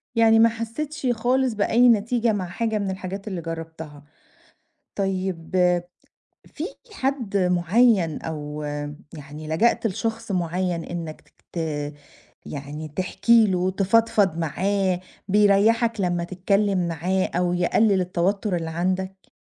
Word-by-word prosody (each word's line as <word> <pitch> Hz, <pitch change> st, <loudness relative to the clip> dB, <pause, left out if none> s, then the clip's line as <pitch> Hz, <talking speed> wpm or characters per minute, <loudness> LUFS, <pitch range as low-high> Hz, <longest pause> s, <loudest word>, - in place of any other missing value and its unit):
يعني 225 Hz, -1 st, +5 dB
ما 230 Hz, +1 st, +7 dB
حستش 255 Hz, +6 st, -4 dB
خالص 250 Hz, +2 st, +1 dB
بأي 230 Hz, +4 st, +4 dB
نتيجة 230 Hz, +1 st, +2 dB
مع 195 Hz, -3 st, -2 dB
حاجة 220 Hz, +4 st, -1 dB
من 200 Hz, -2 st, -2 dB
الحاجات 190 Hz, +2 st, -6 dB
اللي 185 Hz, -4 st, -4 dB
جربتها. 160 Hz, -3 st, -7 dB, 0.9 s
طيب، 190 Hz, -4 st, -2 dB, 0.9 s
في 305 Hz, -, -7 dB, 0.3 s
حد 260 Hz, -, -2 dB
معيّن، 180 Hz, 0 st, +3 dB
أو 150 Hz, -1 st, -5 dB, 0.5 s
يعني 150 Hz, 0 st, -9 dB
لجأت 225 Hz, +8 st, +2 dB
لشخص 225 Hz, +2 st, -3 dB
معيّن، 175 Hz, -1 st, -1 dB
إنك 165 Hz, -3 st, -7 dB, 0.2 s
ت -, -, -5 dB, 0.9 s
يعني 150 Hz, +2 st, -6 dB
تحكي 190 Hz, +8 st, +3 dB
له، 185 Hz, -1 st, +1 dB
تفضفض 200 Hz, -2 st, +2 dB
معاه، 185 Hz, +3 st, 0 dB, 0.3 s
بيريحك 210 Hz, +3 st, +3 dB
لمّا 175 Hz, -2 st, 0 dB
تتكلم 190 Hz, 0 st, 0 dB
معاه، 180 Hz, +3 st, 0 dB
أو 175 Hz, 0 st, +1 dB
يقلل 190 Hz, +3 st, +3 dB
التوتر 185 Hz, +2 st, 0 dB
اللي 165 Hz, -1 st, -3 dB
عندك؟ 185 Hz, +3 st, -3 dB
190 Hz, 115 wpm, -24 LUFS, 170-225 Hz, 0.9 s, ما